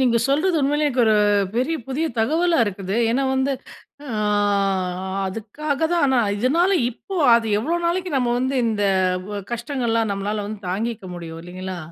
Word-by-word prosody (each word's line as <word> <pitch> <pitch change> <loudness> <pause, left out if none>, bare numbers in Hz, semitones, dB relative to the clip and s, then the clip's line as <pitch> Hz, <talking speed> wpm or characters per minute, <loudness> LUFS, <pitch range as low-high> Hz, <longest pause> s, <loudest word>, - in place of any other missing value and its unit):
நீங்க 245 -3 +3
சொல்றது 320 +6 +2
உண்மையிலயே 295 +2 +1
எனக்கு 260 -3 +1
ஒரு 220 - +4 0.4
பெரிய 285 +7 +1
புதிய 290 +5 -1
தகவலா 325 +8 +2
இருக்குது. 195 -1 -4 0.2
ஏன்னா 270 +3 +1
வந்து, 265 +1 +1 0.5
அ 285 - -9 1.2
அதுக்காக 255 +9 -4
தான் 345 - +2
ஆனா, 265 -2 +2 0.2
இதனால 320 - +2 0.2
இப்போ, 380 - -8 0.2
அது 230 -1 -1
எவ்வளோ 325 +10 -1
நாளைக்கு 360 +1 -1
நம்ம 245 -2 +1
வந்து 260 +1 0
இந்த 215 -2 0 0.5
ஒ - - -3 0.2
கஷ்டங்கள் 240 +1 -2
எல்லாம் 225 -2 +1
நம்மளால 205 +1 -3 0.2
தாங்கிக்க 220 +3 -3
முடியும்! 165 -2 -8
இல்லைங்களா? 185 +1 -6
250 Hz, 150 wpm, -22 LUFS, 210-295 Hz, 1.2 s, ஒரு